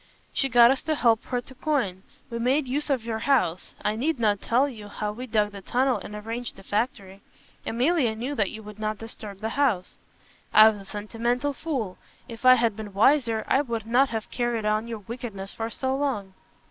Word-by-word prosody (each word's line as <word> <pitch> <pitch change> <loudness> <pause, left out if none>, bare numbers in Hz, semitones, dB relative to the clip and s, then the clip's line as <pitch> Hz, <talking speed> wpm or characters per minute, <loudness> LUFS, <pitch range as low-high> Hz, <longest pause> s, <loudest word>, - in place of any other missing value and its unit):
"She 270 - +1
got 240 0 +7
us 270 - 0
to 315 - +1
help 230 -5 +3
her 245 -1 -2
to 260 - -13
coin. 250 -10 -1 0.3
We 235 - -3
made 265 +4 +2
use 290 +4 -2
of 260 -5 +1
your 225 -1 -2
house. 200 -10 +1
I 210 - +1
need 280 +5 -1
not 210 -3 +2
tell 255 +5 +2
you 220 -6 -9
how 210 0 -3
we 250 +4 -7
dug 210 -2 +1
the 200 -1 -9
tunnel 255 +6 +1
and 210 - -8
arranged 225 +3 -5
the - - -14
factory. 200 -3 -2 0.5
Emilia 250 -1 +2
knew 250 +6 -3
that 215 -8 +1
you 220 0 -8
would 210 0 -11
not 215 0 -2
disturb 215 -3 -8
the 220 - -1
house 225 -9 0 0.3
" - - -31
"I 215 +1 +10
was 210 -2 -5
a - - -12
sentimental 235 +7 -2
fool. 260 - -3 0.3
If 230 0 -9
I 255 - +10
had 230 -3 +1
been 210 -2 -7
wiser 230 -1 +3
you 275 - +3
would 230 -3 -3
not 250 +4 +3
have 225 -1 -4
carried 240 -3 -1
on 215 +2 +1
your 225 -3 -6
wickedness 225 -5 -6
for 225 0 -3
so 260 +3 -1
long." 255 -9 -2
230 Hz, 210 wpm, -26 LUFS, 210-255 Hz, 0.5 s, I